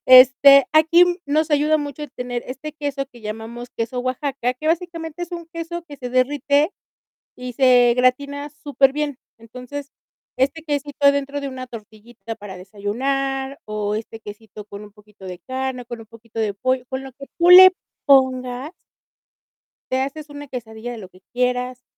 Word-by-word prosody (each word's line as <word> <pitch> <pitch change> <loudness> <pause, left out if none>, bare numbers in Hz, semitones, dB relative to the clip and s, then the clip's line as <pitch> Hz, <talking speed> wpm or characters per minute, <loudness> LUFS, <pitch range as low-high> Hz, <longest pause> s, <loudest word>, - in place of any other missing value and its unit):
este, 265 +2 +8
aquí 320 +3 +6 0.2
nos 310 +2 +1
ayuda 300 +1 +3
mucho 290 0 -6
el 295 - -8
tener 245 -1 -5
este 270 +4 -7
queso 285 -2 -4
que 240 - -16
llamamos 225 +3 -7
queso 235 +2 -4
Oaxaca, 255 0 -2
que 305 +5 -7
básicamente 335 -1 -2
es 350 +1 -7
un 340 -1 -6
queso 335 +1 -5
que 285 - -10
se 250 -2 -7
derrite 285 +5 +2 0.7
y 250 -1 -7
se 245 -2 +5
gratina 280 +3 0
superbién. 285 -1 0 0.2
Entonces, 250 +5 -9 0.5
este 280 +5 0
quesito 290 -1 0
adentro 280 0 +1
de 280 - -4
una 255 -1 -7
tortillita 225 0 -10
para 195 -2 -10
desayunar, 265 +8 -3
o 210 -1 -2
este 225 0 -7
quesito 210 0 -11
con 205 0 -10
un 210 - -13
poquito 210 -1 -20
de 180 -1 -7
carne, 260 +2 -4
con 235 -1 -8
un - - -13
poquito 230 0 -15
de 215 -2 0
pollo, 255 +5 -1
con 260 0 -3
lo 265 -2 -10
que 275 +1 -12
tú 345 +1 +4
le 370 +1 +11 0.3
pongas 260 0 +2 1.2
te 260 0 +1
haces 290 +2 -5
una 290 0 -9
quesadilla 235 -2 -7
de 240 - -7
lo 190 -4 -10
que 185 - -21
quieras. 250 0 -1
260 Hz, 165 wpm, -21 LUFS, 235-285 Hz, 1.2 s, le